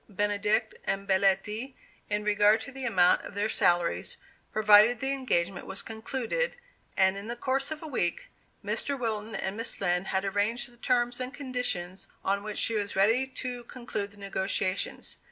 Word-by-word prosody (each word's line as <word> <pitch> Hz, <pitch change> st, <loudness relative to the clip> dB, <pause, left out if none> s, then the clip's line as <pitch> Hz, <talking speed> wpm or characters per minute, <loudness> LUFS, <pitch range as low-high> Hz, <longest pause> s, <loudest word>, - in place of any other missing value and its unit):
Benedict 205 Hz, +2 st, 0 dB
and 195 Hz, 0 st, -2 dB
Belletti, 205 Hz, +6 st, +1 dB, 0.3 s
in 210 Hz, 0 st, 0 dB
regard 210 Hz, +1 st, +4 dB
to 275 Hz, -, -7 dB
the 265 Hz, -1 st, -6 dB
amount 180 Hz, -7 st, +4 dB
of -, -, -10 dB
their 205 Hz, +1 st, +1 dB
salaries, 175 Hz, -5 st, +1 dB, 0.3 s
provided 215 Hz, +2 st, +6 dB
the 270 Hz, +2 st, -1 dB
engagement 195 Hz, -10 st, -1 dB
was 190 Hz, -, -3 dB
concluded, 265 Hz, -, -2 dB, 0.4 s
and 190 Hz, 0 st, +4 dB
in 200 Hz, +2 st, -7 dB
the 235 Hz, -, -3 dB
course 265 Hz, +3 st, -1 dB
of 315 Hz, 0 st, -5 dB
a -, -, -5 dB
week, 175 Hz, -, -1 dB, 0.4 s
Mr. 280 Hz, -1 st, -1 dB
Wilton 220 Hz, -2 st, -3 dB
and 190 Hz, +1 st, -2 dB
Miss 230 Hz, +1 st, -4 dB
Lind 180 Hz, -1 st, 0 dB
had 190 Hz, +1 st, 0 dB
arranged 205 Hz, +5 st, 0 dB
the 240 Hz, -, -20 dB
terms 245 Hz, 0 st, +1 dB
and 255 Hz, 0 st, -3 dB
conditions 250 Hz, -10 st, -4 dB, 0.2 s
on 200 Hz, +1 st, +1 dB
which 210 Hz, 0 st, -5 dB
she 230 Hz, -, +3 dB
was 205 Hz, -2 st, -2 dB
ready 225 Hz, +7 st, +3 dB
to 250 Hz, -2 st, -5 dB
conclude 225 Hz, -5 st, -5 dB
the 205 Hz, -, -18 dB
negotiations. 195 Hz, -1 st, -1 dB
210 Hz, 170 wpm, -29 LUFS, 195-245 Hz, 0.4 s, provided